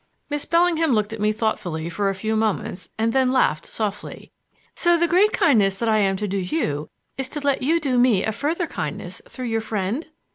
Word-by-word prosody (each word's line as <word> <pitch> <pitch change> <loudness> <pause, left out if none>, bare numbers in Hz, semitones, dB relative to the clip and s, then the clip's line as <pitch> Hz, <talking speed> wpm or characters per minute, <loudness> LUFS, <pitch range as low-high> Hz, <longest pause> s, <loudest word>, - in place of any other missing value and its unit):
Miss 290 0 -1
Bellingham 335 -3 +3
looked 215 0 0
at 225 - -6
me 210 0 +3
thoughtfully 180 -7 -2
for 195 +4 -1
a 195 - -2
few 220 +3 -2
moments, 215 -4 -1
and 225 +1 +1
then 260 -1 +3
laughed 255 -12 +1
softly. 210 -2 -5 0.4
"So 345 -1 +3
the 340 +1 +2
great 380 +5 +4
kindness 205 - +3
that 230 - -2
I 215 -1 +3
am 195 -2 +2
to 210 - -2
do 195 0 -1
you 180 - -2 0.3
is 265 0 -2
to 300 - -4
let 280 -2 0
you 320 +6 +2
do 265 -6 +1
me 240 -6 +4
a 220 - 0
further 310 - -1
kindness - - -5
through 255 - -6
your 225 -1 -1
friend?" 215 - -3
225 Hz, 210 wpm, -23 LUFS, 200-290 Hz, 0.4 s, great